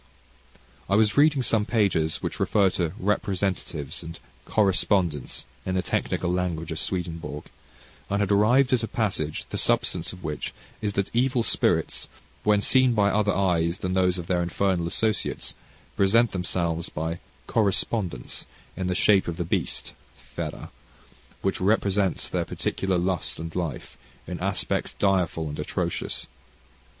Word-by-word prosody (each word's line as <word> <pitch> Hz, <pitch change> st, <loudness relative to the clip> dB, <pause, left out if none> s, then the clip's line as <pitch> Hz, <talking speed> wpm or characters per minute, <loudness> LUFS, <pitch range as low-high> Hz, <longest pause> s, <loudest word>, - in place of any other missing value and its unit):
I 100 Hz, -, +3 dB
was 105 Hz, -1 st, +3 dB
reading 145 Hz, -2 st, +5 dB
some 110 Hz, -2 st, +2 dB
pages 100 Hz, -8 st, +1 dB
which -, -, -3 dB
refer 100 Hz, -3 st, +3 dB
to 85 Hz, -3 st, -1 dB
"representatives" 95 Hz, -, -1 dB
and 80 Hz, 0 st, -8 dB, 0.3 s
"correspondents," 95 Hz, -, +1 dB, 0.2 s
in 95 Hz, -, -2 dB
the 90 Hz, -, +1 dB
technical 90 Hz, 0 st, -1 dB
language 85 Hz, -3 st, -2 dB
of 80 Hz, -, -3 dB
Swedenborg, 85 Hz, -5 st, -3 dB, 0.6 s
and 100 Hz, -, +1 dB
had 100 Hz, -1 st, +1 dB
arrived 120 Hz, +7 st, +4 dB
at 125 Hz, -, +3 dB
a 115 Hz, -, -2 dB
passage, 95 Hz, -11 st, -2 dB
the -, -, 0 dB
substance 85 Hz, -1 st, +1 dB
of 90 Hz, -1 st, -12 dB
which 75 Hz, -1 st, -4 dB, 0.3 s
is, 105 Hz, -2 st, -1 dB
that 100 Hz, -1 st, -1 dB
evil 125 Hz, 0 st, +2 dB
spirits, -, -, +1 dB, 0.4 s
when 105 Hz, -1 st, +4 dB
seen 130 Hz, +1 st, +4 dB
by 100 Hz, -2 st, +4 dB
other 105 Hz, 0 st, +2 dB
eyes 85 Hz, -3 st, +1 dB
than 90 Hz, 0 st, -2 dB
those 90 Hz, -1 st, +2 dB
of 90 Hz, -, -5 dB
their 90 Hz, 0 st, +1 dB
infernal 85 Hz, 0 st, 0 dB
associates, 110 Hz, +3 st, -1 dB, 0.4 s
present 110 Hz, +4 st, +4 dB
themselves, 85 Hz, -2 st, -1 dB
by 80 Hz, +2 st, -3 dB, 0.3 s
"correspondence," 100 Hz, -, 0 dB, 0.3 s
in 95 Hz, -, -2 dB
the 90 Hz, -, 0 dB
shape 100 Hz, -1 st, +4 dB
of 85 Hz, -1 st, -3 dB
the 85 Hz, -, -2 dB
beast -, -, -1 dB, 0.2 s
(fera) -, -, -7 dB, 0.7 s
which 95 Hz, -, 0 dB
represents 100 Hz, -2 st, +2 dB
their -, -, -1 dB
particular 95 Hz, -1 st, -1 dB
lust 90 Hz, 0 st, 0 dB
and 80 Hz, 0 st, -6 dB
life, 85 Hz, -8 st, -4 dB, 0.3 s
in 90 Hz, 0 st, -5 dB
aspect 95 Hz, +1 st, -1 dB
direful 90 Hz, -5 st, +1 dB
and 75 Hz, 0 st, -6 dB
atrocious. -, -, -2 dB
95 Hz, 145 wpm, -26 LUFS, 85-105 Hz, 0.7 s, reading